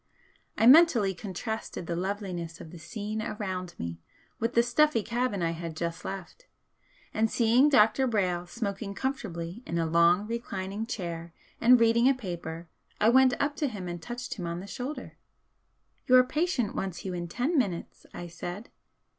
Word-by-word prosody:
I - - +3
mentally 250 - +7
contrasted 205 0 -5
the 170 - -3
loveliness 180 -3 -4
of 160 - -10
the 175 - -10
scene 210 +6 -4
around 185 -5 -4
me 85 0 -5 0.4
with 230 +2 -1
the 235 - +6
stuffy 245 0 +3
cabin 235 -5 -1
I 165 - +1
had 165 -1 -6
just 170 +1 -3
left, 195 - -7 0.7
and 220 +1 +2
seeing 240 +6 +4
Dr. 260 0 +4
Brayle 180 -6 0
smoking 200 -1 -4
comfortably 210 -8 -4
in 170 - -3
a 165 - +1
long 170 +4 +4
reclining 210 -2 -4
chair 170 -6 -5 0.3
and 245 +1 +7
reading 230 +2 +5
a 270 - +3
paper 170 -6 -6 0.3
I 215 - +5
went 260 0 +5
up 290 +1 0
to 295 - +1
him 200 -7 -6
and 175 -1 -5
touched 245 +5 -5
him 175 - -3
on 170 +1 -3
the 190 - -8
shoulder. 255 +8 -6 0.9
"Your 255 -1 +7
patient 265 - 0
wants 190 -1 -4
you 185 - -3
in 175 -1 -4
ten 250 - -1
minutes," 195 - -2
I 175 - -7
said. 175 +5 -7
205 Hz, 165 wpm, -28 LUFS, 175-240 Hz, 0.9 s, mentally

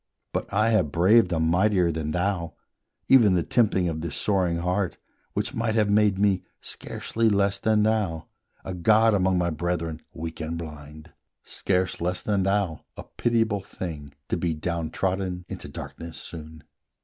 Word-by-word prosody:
But - - -3
I 110 +2 +3
have 95 -10 +2
braved 95 +4 +4
a 85 - +1
mightier 90 +2 +3
than 80 -1 -3
thou, 90 0 -1 0.5
Even 115 -8 +6
the 85 - +2
tempting 100 -5 +2
of 80 -2 -3
this 85 -3 -4
soaring 90 -5 +1
heart, 90 +2 -1 0.4
Which - - -2
might 115 -1 -1
have 105 -2 +2
made 105 -2 +3
me, 100 -2 +2 0.2
scarcely 115 0 -2
less 100 -1 +2
than 110 -1 +2
thou, 105 -7 0 0.4
A 95 - -4
god 110 +5 +4
among 95 -2 +2
my 85 -1 +1
brethren 80 0 -2
weak 80 +1 -6
and 80 +1 -3
blind, 75 -1 -9 0.3
Scarce 95 -2 -1
less 90 +1 -1
than 100 -2 +1
thou, 95 -4 0
a - - -6
pitiable 115 -4 0
thing 80 -6 -7 0.2
To - - 0
be 85 -2 -1
down 85 0 -3
trodden 95 -1 -2
into - - -7
darkness 85 -1 -8
soon. 80 -2 -9
90 Hz, 160 wpm, -25 LUFS, 85-105 Hz, 0.5 s, Even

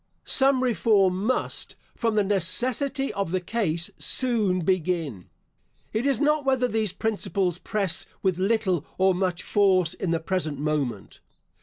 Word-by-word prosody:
Some 265 -1 +3
reform 205 -6 +2
must, 255 +2 -2 0.2
from 230 -4 -1
the 210 - +3
necessity 245 - 0
of 200 -3 -2
the 185 - +1
case, 170 -4 -2
soon 215 -8 +1
begin. 165 - -1 0.6
It 225 +5 0
is 275 -5 +1
not 300 0 +2
whether 265 -2 +2
these 220 -4 0
principles 195 -4 -1
press 200 -5 -1 0.2
with 185 -2 +1
little 190 -5 +1
or 190 0 +4
much 180 -1 -2
force 185 -5 +2
in 185 - -4
the 165 0 +1
present 160 -4 -2
moment. 140 -8 -3
195 Hz, 140 wpm, -25 LUFS, 175-230 Hz, 0.6 s, or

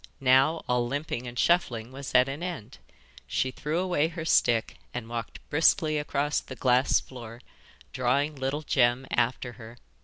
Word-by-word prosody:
Now 135 +4 +4
all 125 -1 +1
limping 140 -2 -3
and 120 0 -8
shuffling 120 -10 +1
was 135 0 -8
at 125 +1 +6
an 140 +4 -5
end. 165 - -6 0.5
She 130 - -1
threw 150 +5 -3
away 175 -4 +1
her 165 -1 -6
stick 115 -7 +2 0.2
and 125 -2 -4
walked 115 -1 -7
briskly 155 0 +3
across 145 0 0
the 130 - -10
glass 125 +1 +3
floor, 120 -2 -10 0.5
drawing 140 +4 +1
little 135 +3 -3
Jem 125 -2 +2
after 125 +1 0
her. 115 +2 -11
130 Hz, 155 wpm, -27 LUFS, 120-150 Hz, 0.5 s, at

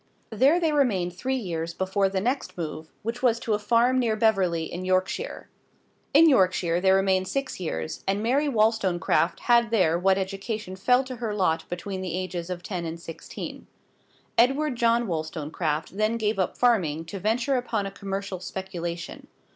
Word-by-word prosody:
There 270 +10 +4
they 325 -3 +1
remained 200 -12 +1
three 260 +8 -2
years 170 -8 -3
before 195 +1 +1
the 190 0 -1
next 250 +4 -2
move, 155 -1 -5
which 230 +3 -4
was 235 -3 +3
to 225 - -1
a 210 - +1
farm 240 +4 +3
near 230 -3 +1
Beverley, 195 -7 +2
in 175 +3 -5
Yorkshire. 185 - -1 0.6
In 320 +4 +7
Yorkshire 185 - +3
they 190 - +3
remained 190 -1 +3
six 275 -1 -3
years, 80 - -4
and 195 +2 0
Mary 280 +6 +2
Wollstonecraft 215 -7 +1
had 235 -1 +4
there 175 -7 +2
what 190 +1 +3
education 195 +1 -4
fell 250 +7 +3
to 260 -1 -7
her 220 -3 -3
lot 165 -5 0
between 185 +2 -4
the 180 -3 -3
ages 185 -2 -4
of 180 -1 -5
ten 180 -2 -4
and 165 0 -5
sixteen. 165 -1 -8 0.7
Edward 270 +3 +3
John 235 0 +2
Wollstonecraft 155 -1 -3
then 215 +2 +1
gave 215 -2 -1
up 185 - -1
farming 170 -11 +2
to 195 +4 -6
venture 235 +7 +1
upon 225 -4 -2
a 195 - -4
commercial 195 -1 -5
speculation. 175 -2 -6
195 Hz, 170 wpm, -26 LUFS, 175-235 Hz, 0.7 s, In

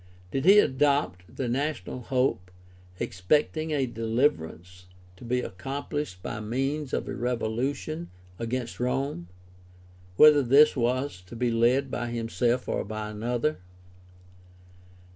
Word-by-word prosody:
Did 135 +2 -1
he 195 +3 +8
adopt 130 - +2
the 130 - -2
national 140 +2 -2
hope, 125 -8 0 0.5
expecting 150 - 0
a 145 -3 +1
deliverance 110 - -2 0.3
to - - -13
be 125 +1 -1
accomphshed 135 0 -5
by - - -4
means 135 +6 -2
of - - -2
a - - -4
revolution 125 +6 -2 0.3
against 120 +1 -3
Rome, 125 -7 -2 0.9
whether 150 +5 +8
this 140 +4 +6
was 125 -4 -1
to 105 - -10
be 120 0 0
led 125 +4 +2
by 120 -1 -2
himself 120 +1 -1
or - - -1
by 105 +1 -5
another 120 +7 -1
125 Hz, 120 wpm, -27 LUFS, 110-140 Hz, 0.9 s, he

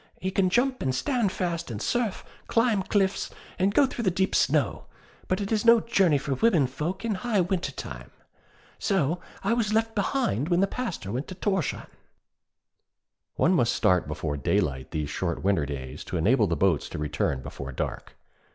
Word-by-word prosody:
He 190 - -2
can 190 -1 +2
jump 255 +6 +1
and 130 -2 0
stand 235 - +1
fast 170 -4 -2
in 110 -3 -5
surf, 240 - -1 0.2
climb 230 -3 +2
cliffs, 195 0 0 0.3
and 190 +2 +3
go 275 +7 +5
through 245 -3 -4
deep 190 +1 +1
snow. - - +1 0.4
But 185 - 0
it 200 - -3
is 215 -2 +1
no 235 0 +7
journey 195 -9 +3
for 140 0 -2
women 165 - +3
folk 160 - -4
in 225 - 0
high 210 +2 0
winter 180 0 -1
time.' - - -8 0.7
So 175 -4 +1 0.2
I - - +2
was 220 -3 0
left 225 0 +1
behind 200 - 0
when 175 -1 +3
the 195 - +5
Pastor 195 - -4
went 130 +6 -3
to 185 - -7
Thorshavn. 190 -5 -1 1.5
One - - +3
must - - +2
start 90 -4 +2
before 75 -1 -3
daylight 65 -1 0
these 75 -2 -3
short 85 0 -2
winter 95 -7 +2
days 70 0 -6
to 90 - -3
enable 105 +6 +3
the 85 - 0
boats 90 -3 +2
to - - -6
return 70 -3 -1
before 70 -1 -7
dark. 65 - -5
180 Hz, 180 wpm, -27 LUFS, -, 1.5 s, no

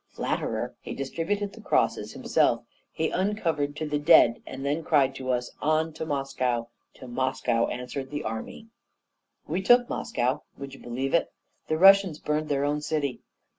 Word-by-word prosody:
Flatterer! - - -2
he - - -6
distributed 195 +9 -2
the 225 - -12
crosses 115 - 0
himself, 130 -3 +1 0.3
he 160 - -1
uncovered 170 -7 -1
to 155 - -3
the 150 -1 -1
dead, 145 -6 +6
and 135 - -6
then 145 +2 +1
he - - -5
cried 140 -4 +3
to 130 -1 -6
us, 125 -1 -1
'On! 155 +1 +1
to 160 0 -5
Moscow!' 130 -4 -1 0.3
'To 130 - -11
Moscow!' 125 -2 0
answered 125 +2 -5
the 145 0 -4
army. 110 - -6 0.8
"We 185 - -1
took 245 +5 +5
Moscow. 125 +1 -1 0.2
Would 140 -1 -8
you 135 - -11
believe 130 +3 -3
it? 170 - +2 0.4
the 155 - 0
Russians 195 -2 +6
burned 150 0 -2
their 140 -1 +1
own 145 +1 0
city! 150 -4 -2
145 Hz, 170 wpm, -27 LUFS, 130-160 Hz, 0.8 s, dead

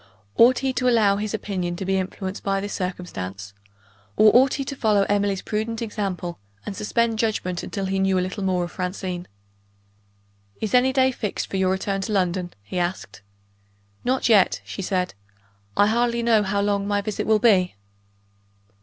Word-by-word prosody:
Ought 245 +2 +6
he 265 0 -1
to 250 0 +1
allow 210 -4 +4
his 210 0 -3
opinion 185 -5 -3
to 190 +2 -5
be 190 +1 +1
influenced 190 +1 -5
by 195 0 0
this 205 +1 -5
circumstance? 100 - -5 0.6
or 215 +1 +6
ought 260 +2 +5
he 275 - -3
to 280 - -5
follow 210 -5 +3
Emily's 200 -1 0
prudent 220 +1 -2
example, 195 -6 -4 0.3
and 200 - -5
suspend 225 +2 0
judgment 185 -6 -1
until 195 -1 -4
he 190 0 -1
knew 190 -1 +2
a 180 - +1
little 185 +3 -5
more 185 -2 +1
of 175 - -5
Francine? 180 -1 -4 1.3
"Is 220 +1 -3
any 250 +1 +5
day 260 0 +3
fixed 215 -5 -4
for 195 - -1
your 190 -1 +2
return 195 +1 -1
to 210 - -3
London?" 180 -2 0
he 180 - -4
asked. 175 - -3 0.8
"Not 260 0 +1
yet," 210 -5 +4
she - - -6
said; 185 -1 -1 0.6
"I 205 - +6
hardly 235 +2 +1
know 230 -2 +4
how 200 0 0
long 200 0 0
my 205 0 +1
visit 210 0 -3
will 220 0 +5
be." 200 - +3
200 Hz, 175 wpm, -23 LUFS, 185-220 Hz, 1.3 s, Ought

